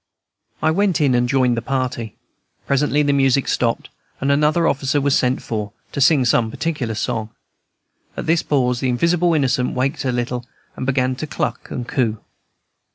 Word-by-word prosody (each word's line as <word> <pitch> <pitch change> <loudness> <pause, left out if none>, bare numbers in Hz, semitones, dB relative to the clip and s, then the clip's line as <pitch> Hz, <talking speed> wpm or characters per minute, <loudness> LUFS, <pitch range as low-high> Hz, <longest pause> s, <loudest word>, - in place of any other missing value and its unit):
I 155 - +4
went 190 0 +1
in, 140 -4 +3
and 120 0 +2
joined 125 -2 +2
the 115 - -2
party. 125 -4 -3 0.5
Presently 145 +1 +2
the 145 -1 +2
music 135 -1 +2
stopped, 115 -2 0 0.3
and 135 +1 +1
another 150 +4 +3
officer 135 +1 +1
was 140 -1 +2
sent 125 +1 +1
for, 105 -2 -4 0.2
to 140 - -3
sing 140 -2 +5
some 115 -1 +2
particular 130 -5 -3
song. 110 -1 -2 0.9
At - - -4
this 165 +1 +2
pause 125 -4 +1
the 130 - 0
invisible 170 +6 +2
innocent 130 -3 +1
waked 135 +5 -1
a 130 - 0
little, 120 0 -2 0.3
and 130 - -5
began 130 -1 +1
to 155 - -4
cluck - - -3
and 120 -1 -5
coo. 115 -5 0
130 Hz, 170 wpm, -20 LUFS, 125-145 Hz, 0.9 s, sing